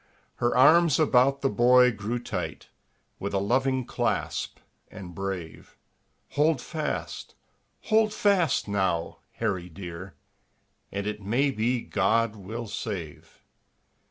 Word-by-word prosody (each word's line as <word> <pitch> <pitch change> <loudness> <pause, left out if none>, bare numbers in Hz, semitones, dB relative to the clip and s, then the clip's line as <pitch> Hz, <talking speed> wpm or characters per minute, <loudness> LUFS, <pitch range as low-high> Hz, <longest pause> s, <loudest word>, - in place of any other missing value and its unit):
Her 120 +1 +1
arms 160 +2 +6
about 135 -2 +3
the 135 - +2
boy 125 +1 +5
grew 110 +2 -3
tight, 105 -7 -5 0.5
With 100 +1 -3
a - - +3
loving 130 +5 +1
clasp, - - -2 0.3
and 95 -4 -10
brave; 95 -3 -6 0.5
"Hold 150 +1 +2
fast! 155 -2 -5 0.5
Hold 220 -1 +3
fast, 195 - +2
now, 95 -5 -1
Harry 95 -6 -2
dear, 90 0 -9 0.8
And 100 0 -3
it 105 0 -4
may 125 +8 +1
be 120 +1 0
God 110 +3 +1
will 110 +4 -6
save." 90 -9 -7
115 Hz, 115 wpm, -27 LUFS, 95-130 Hz, 0.8 s, arms